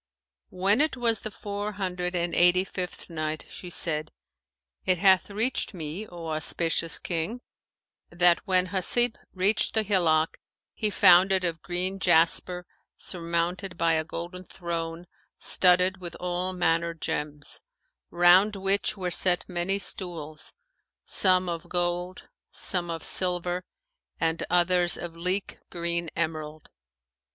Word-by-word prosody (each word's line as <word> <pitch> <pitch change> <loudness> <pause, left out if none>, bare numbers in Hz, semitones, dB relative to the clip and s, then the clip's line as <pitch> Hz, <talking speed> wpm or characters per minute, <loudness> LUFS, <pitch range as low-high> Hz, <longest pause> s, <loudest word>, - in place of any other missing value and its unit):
When 195 +7 +2
it 310 -3 +1
was 230 -3 +1
the 215 - -6
Four 205 0 -5
Hundred 180 -2 -3
and 175 0 -1
Eighty 180 +1 +5
fifth 185 -2 -6
Night, 155 -2 -4
She 180 - -8
said, 155 -2 -1 0.7
It 185 -1 +2
hath 190 +1 +4
reached 220 +1 -1
me, 165 +6 -5
O 170 -2 -8
auspicious 165 +1 0
King, 175 +8 -3 0.7
that 175 0 +4
when 185 -1 +2
Hasib 225 +5 +1 0.2
reached 195 +5 +1
the 220 - +3
hillock 165 -6 +1 0.3
he 215 - -1
found 190 -1 +6
it 190 -1 +2
of 170 -2 -2
green 185 +2 -2
jasper 175 +1 +2 0.3
surmounted 175 +2 -3
by 165 -1 +2
a 160 0 +1
golden 175 +3 -7
throne 170 -1 -5 0.3
studded 180 +1 +4
with 175 -3 -8
all 180 +1 -2
manner 170 -2 0
gems, 150 -2 -3 0.5
round 180 +4 +5
which 195 +2 0
were 180 -2 -3
set 180 0 +4
many 180 +2 -1
stools, 165 -6 -3 0.5
some 185 -1 +6
of 170 -2 -5
gold, 175 +1 -2 0.2
some 175 -2 -2
of 165 -1 -4
silver 180 0 -1 0.5
and 165 0 0
others 175 0 +3
of 170 -1 -7
leek 180 +4 -2
green 170 -1 -2
emerald. 155 -2 -4
180 Hz, 130 wpm, -27 LUFS, 170-190 Hz, 0.7 s, found